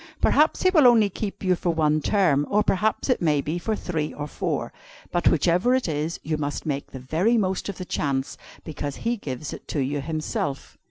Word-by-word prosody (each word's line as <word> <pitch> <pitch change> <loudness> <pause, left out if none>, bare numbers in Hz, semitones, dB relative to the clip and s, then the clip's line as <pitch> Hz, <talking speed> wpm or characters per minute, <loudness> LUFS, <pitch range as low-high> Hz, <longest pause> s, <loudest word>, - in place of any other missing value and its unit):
Perhaps 305 +2 +3
He 370 - +5
will 310 -8 +6
only 220 -4 +5
keep 200 +1 -5
you 185 -1 +3
for 175 - -2
one 155 -2 +2
term, 150 -7 +2
or 210 +1 +3
perhaps 215 +2 0
it 255 -6 +1
may 150 -4 +2
be 155 +5 -2
for 220 +5 -1
three 160 -6 -3
or 145 - -4
four; - - -3 0.4
but 175 - +1
whichever 180 - +3
it 260 - 0
is, 155 +1 -2
you 155 0 -1
must 145 -1 -3
make 140 -2 -2
the - - -8
very 170 - +1
most 190 -2 -1
of 200 - -5
the 185 - -6
chance, 135 -5 -2 0.3
because 145 -2 -5
He 235 +1 -1
gives 145 - -6
it - - -10
to 150 - -2
you 140 +2 -1
Himself.'" 150 -2 -3
165 Hz, 210 wpm, -24 LUFS, 145-205 Hz, 0.4 s, will